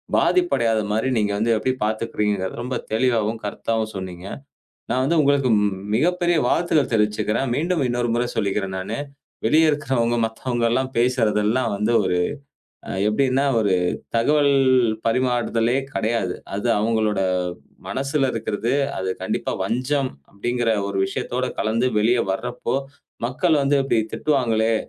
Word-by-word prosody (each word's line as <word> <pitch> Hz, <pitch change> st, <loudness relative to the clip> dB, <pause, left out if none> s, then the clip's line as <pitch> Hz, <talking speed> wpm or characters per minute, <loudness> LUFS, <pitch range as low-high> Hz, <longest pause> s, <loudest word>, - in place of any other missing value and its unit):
பாதிப்பு 355 Hz, -1 st, +3 dB
அடையாத 115 Hz, -2 st, +1 dB
மாதிரி 110 Hz, +4 st, 0 dB
நீங்க 105 Hz, -1 st, 0 dB
வந்து 115 Hz, +2 st, +2 dB
எப்படி 130 Hz, +4 st, 0 dB
பாத்துக்கிறீங்க? 110 Hz, -1 st, -1 dB
என்பதை 95 Hz, 0 st, -4 dB
ரொம்ப 125 Hz, +1 st, -3 dB, 0.2 s
தெளிவாவும், 115 Hz, -1 st, +1 dB
கருத்தாவும் 110 Hz, +1 st, -2 dB
சொன்னீங்க. 95 Hz, -1 st, -6 dB, 0.7 s
நான் 130 Hz, +2 st, +1 dB
வந்து 165 Hz, +5 st, +1 dB
உங்களுக்கு 140 Hz, -2 st, +3 dB
ம் 100 Hz, -2 st, -1 dB
மிகப்பெரிய 175 Hz, +6 st, +2 dB
வாழ்த்துக்கள் 155 Hz, -2 st, +2 dB
தெரிவிச்சுக்கறேன். 105 Hz, +3 st, +1 dB
மீண்டும் 165 Hz, +2 st, 0 dB
இன்னொரு 120 Hz, 0 st, -1 dB
முறை 120 Hz, +1 st, +1 dB
சொல்லிக்கிறேன் 100 Hz, -2 st, -1 dB
நானு. 95 Hz, +8 st, -4 dB, 0.5 s
வெளியில 160 Hz, +1 st, +4 dB
இருக்கிறவங்க, 130 Hz, -5 st, 0 dB
மத்தவங்க 120 Hz, +2 st, -2 dB
எல்லாம் 130 Hz, +2 st, 0 dB
பேசுறது 120 Hz, -4 st, +2 dB
எல்லாம் 115 Hz, +1 st, +1 dB
வந்து 105 Hz, +3 st, 0 dB
ஒரு 90 Hz, -, +1 dB, 0.9 s
எப்படின்னா, 130 Hz, +4 st, +2 dB
ஒரு 100 Hz, -4 st, +2 dB, 0.4 s
தகவல் 145 Hz, +4 st, +3 dB, 0.5 s
பரிமாறுதலே 120 Hz, 0 st, +1 dB, 0.2 s
கிடையாது. 110 Hz, -5 st, -1 dB, 0.2 s
அது 100 Hz, +4 st, -2 dB
அவங்களோட 110 Hz, -2 st, +1 dB, 0.7 s
மனசுல 135 Hz, 0 st, 0 dB
இருக்கிறது, 115 Hz, +2 st, -2 dB, 0.3 s
அது 95 Hz, 0 st, -2 dB
கண்டிப்பா -, -, -2 dB
வஞ்சம் 130 Hz, +5 st, 0 dB, 0.2 s
அப்படிங்கிற 120 Hz, +3 st, -2 dB, 0.2 s
ஒரு 100 Hz, -, -4 dB
விஷயத்தோட 125 Hz, +6 st, -3 dB, 0.2 s
கலந்து 115 Hz, +3 st, +1 dB
வெளியே 115 Hz, +3 st, +3 dB
வர்றபோது, 125 Hz, +5 st, -3 dB, 0.4 s
மக்கள் 150 Hz, +4 st, +1 dB
வந்து 140 Hz, +1 st, +2 dB
இப்படி 115 Hz, -, +2 dB
திட்டுவாங்களே, 115 Hz, -6 st, +1 dB
120 Hz, 130 wpm, -22 LUFS, 110-130 Hz, 0.9 s, வெளியில